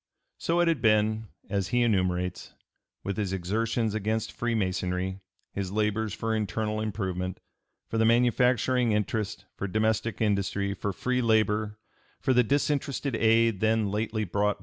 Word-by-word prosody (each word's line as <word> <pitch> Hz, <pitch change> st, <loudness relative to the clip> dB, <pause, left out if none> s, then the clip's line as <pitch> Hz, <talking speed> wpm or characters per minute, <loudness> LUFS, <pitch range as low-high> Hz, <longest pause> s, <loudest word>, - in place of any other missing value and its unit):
So 170 Hz, +1 st, +1 dB
it 175 Hz, -, +3 dB
had 165 Hz, -7 st, +1 dB
been, 110 Hz, 0 st, +2 dB, 0.2 s
as 100 Hz, -3 st, -1 dB
he 120 Hz, +4 st, +2 dB
enumerates, 90 Hz, -4 st, 0 dB, 0.5 s
with 100 Hz, -1 st, -3 dB
his 100 Hz, -3 st, -1 dB
exertions 110 Hz, +4 st, -1 dB
against 110 Hz, +1 st, -1 dB
Freemasonry, 95 Hz, -4 st, -1 dB, 0.3 s
his 95 Hz, -2 st, -3 dB
labors 105 Hz, +1 st, 0 dB
for 110 Hz, +3 st, -2 dB
internal 110 Hz, +1 st, -1 dB
improvement, 95 Hz, -4 st, -3 dB, 0.5 s
for 115 Hz, -, -2 dB
the 110 Hz, -, +4 dB
manufacturing 125 Hz, 0 st, +3 dB
interest, 105 Hz, 0 st, -2 dB
for 100 Hz, -, -3 dB
domestic 110 Hz, +1 st, 0 dB
industry, 100 Hz, -2 st, 0 dB
for 100 Hz, 0 st, -3 dB
free 125 Hz, +6 st, -1 dB
labor, 110 Hz, -2 st, +1 dB, 0.4 s
for 130 Hz, -, +1 dB
the 125 Hz, -, +5 dB
disinterested 140 Hz, 0 st, 0 dB
aid 115 Hz, -2 st, +3 dB
then 110 Hz, -1 st, +2 dB
lately 110 Hz, +1 st, -1 dB
brought 105 Hz, +2 st, 0 dB
(p. -, -, -30 dB
110 Hz, 145 wpm, -28 LUFS, 100-115 Hz, 0.5 s, the